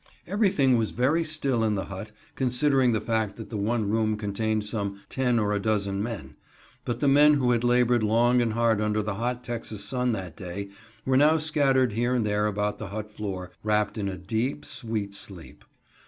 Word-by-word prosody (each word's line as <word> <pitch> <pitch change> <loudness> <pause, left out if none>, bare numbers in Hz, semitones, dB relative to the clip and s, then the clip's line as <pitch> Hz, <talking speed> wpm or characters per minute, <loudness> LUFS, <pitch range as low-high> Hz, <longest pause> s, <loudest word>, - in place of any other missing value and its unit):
Everything 180 - +3
was 110 -2 0
very 145 +8 +1
still 140 -7 -1
in 110 -1 +1
the 95 - -2
hut, 100 +3 -8 0.2
considering 130 0 +2
the 110 - +1
fact 110 -1 -1
that 110 -1 -9
the - - -4
one 110 +1 0
room 110 0 +1
contained 105 +1 -1
some 100 -2 -3
ten 125 -2 +1
or 105 -2 +1
a 105 - 0
dozen 100 -2 0
men; 115 -1 -5 0.5
but 120 -1 -3
the 145 - +3
men 145 +2 +6
who 125 -3 +2
had 120 -1 +1
labored 120 -1 +3
long 120 +3 +3
and 115 -2 0
hard 115 -2 +2
under 105 0 0
the 105 -1 -2
hot 120 +4 -3
Texas 115 -4 -5
sun 125 +3 -1
that 95 -5 -5
day 100 0 -6 0.4
were 130 0 +3
now 150 +3 +5
scattered 135 -6 +2
here 120 +3 +1
and 120 -3 +1
there 105 0 +1
about 105 0 -2
the 110 - -5
hut 105 +2 -6
floor, 95 -4 -5
wrapped 105 0 +1
in 100 -3 -2
a 95 - -5
deep, 110 +8 -2
sweet 110 -4 -4
sleep. 95 -4 -9
110 Hz, 200 wpm, -26 LUFS, 105-125 Hz, 0.5 s, men